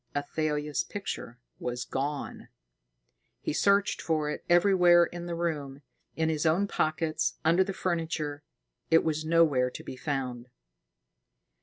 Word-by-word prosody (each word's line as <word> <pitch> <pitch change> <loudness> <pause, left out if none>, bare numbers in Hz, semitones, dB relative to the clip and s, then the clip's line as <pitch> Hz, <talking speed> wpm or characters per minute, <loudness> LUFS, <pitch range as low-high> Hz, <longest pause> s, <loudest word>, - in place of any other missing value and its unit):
Athalia's 150 0 -1
picture 195 - -6 0.2
was 125 0 -3
gone. 140 +3 -4 0.9
He - - -3
searched 200 +4 +2
for 155 -2 0
it - - -6
everywhere 175 -1 +6
in 175 0 -7
the 170 - -3
room, 145 -5 -3 0.3
in 160 0 0
his 155 -2 0
own 170 +5 +2
pockets, 155 -2 0
under 170 +4 +5
the 195 - -4
furniture. 160 -5 -2 0.5
It 165 0 +5
was 155 -1 -1
nowhere 155 -6 +3
to - - -9
be - - -7
found. 125 -3 -4
155 Hz, 130 wpm, -29 LUFS, 145-170 Hz, 0.9 s, everywhere